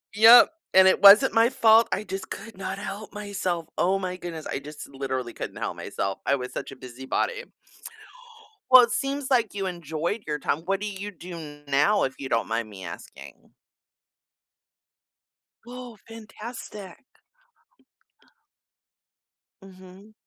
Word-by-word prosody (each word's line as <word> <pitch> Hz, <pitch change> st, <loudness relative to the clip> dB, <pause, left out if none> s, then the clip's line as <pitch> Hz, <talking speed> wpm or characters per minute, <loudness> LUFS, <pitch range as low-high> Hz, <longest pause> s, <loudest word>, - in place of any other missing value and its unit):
Yep, 225 Hz, +3 st, +8 dB, 0.2 s
and 190 Hz, 0 st, +7 dB
it -, -, +1 dB
wasn't 205 Hz, +7 st, +8 dB
my 230 Hz, +1 st, +4 dB
fault, 225 Hz, -2 st, +5 dB
I 200 Hz, -, -2 dB
just 190 Hz, -1 st, -7 dB
could 215 Hz, -1 st, -9 dB
not 195 Hz, 0 st, -5 dB
help 200 Hz, +1 st, -7 dB
myself, 190 Hz, -5 st, -4 dB
oh 190 Hz, +2 st, +2 dB
my 185 Hz, -1 st, -4 dB
goodness, 165 Hz, -3 st, -7 dB
I -, -, -4 dB
just 150 Hz, +1 st, -10 dB
literally 130 Hz, -3 st, -4 dB
couldn't -, -, -7 dB
help -, -, -4 dB
myself. 95 Hz, 0 st, -4 dB
I 140 Hz, -, +2 dB
was 125 Hz, -1 st, -6 dB
such -, -, -6 dB
a -, -, -12 dB
busy 130 Hz, 0 st, -11 dB
body. -, -, -2 dB, 1.3 s
Well, 255 Hz, -1 st, +10 dB
it 235 Hz, -, -1 dB
seems 275 Hz, 0 st, -3 dB
like 235 Hz, -5 st, +1 dB
you 195 Hz, -1 st, -3 dB
enjoyed 170 Hz, +3 st, -4 dB
your 150 Hz, -1 st, -2 dB
time, 145 Hz, -, -1 dB
what 195 Hz, +3 st, -2 dB
do 210 Hz, -, -4 dB
you 200 Hz, 0 st, -6 dB
do 165 Hz, -5 st, -10 dB
now, 150 Hz, +10 st, +2 dB
if 130 Hz, -, -1 dB
you 135 Hz, -, -6 dB
don't 115 Hz, -, 0 dB
mind 115 Hz, -1 st, -3 dB
me 95 Hz, -3 st, -10 dB
asking? 85 Hz, -, -11 dB, 2.2 s
Whoa, 245 Hz, -2 st, -10 dB
fantastic. 220 Hz, -1 st, -10 dB, 2.6 s
Mhm. 190 Hz, +2 st, -15 dB
190 Hz, 145 wpm, -25 LUFS, 150-215 Hz, 2.6 s, Well